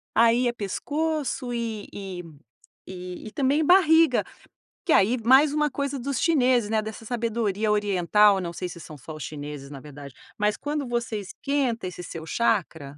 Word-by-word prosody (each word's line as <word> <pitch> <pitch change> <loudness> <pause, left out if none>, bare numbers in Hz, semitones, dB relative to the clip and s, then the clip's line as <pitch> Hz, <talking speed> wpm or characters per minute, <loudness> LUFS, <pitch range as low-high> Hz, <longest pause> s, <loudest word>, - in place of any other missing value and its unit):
Aí 235 +2 +4
é 240 - 0
pescoço 285 +4 -2
e 225 -3 -4
e 190 -3 -6 1.0
e 215 - -8
também 280 +6 +1
barriga, 325 -1 +5 0.6
que 340 - 0
aí 225 +6 +4
mais 270 +5 +6
uma 300 -2 +1
coisa 280 0 -3
dos 270 0 -2
chineses, 255 -9 +3
né, 220 -1 +1
dessa 220 +1 -8
sabedoria 220 -3 -1
oriental, 205 0 +3
não 170 -1 -4
sei 180 +1 -4
se 170 - -10
são 155 -2 -10
só 155 +4 -9
os 155 - -7
chineses, 145 -1 -7
na 140 - -8
verdade, 145 -1 -11 0.2
mas 210 0 +1
quando 295 -1 -3
você 235 -2 -2
esquenta 235 +1 -2
esse 180 0 -7
seu 165 -2 -8
chacra, 160 -9 -1
225 Hz, 160 wpm, -25 LUFS, 185-265 Hz, 1.0 s, mais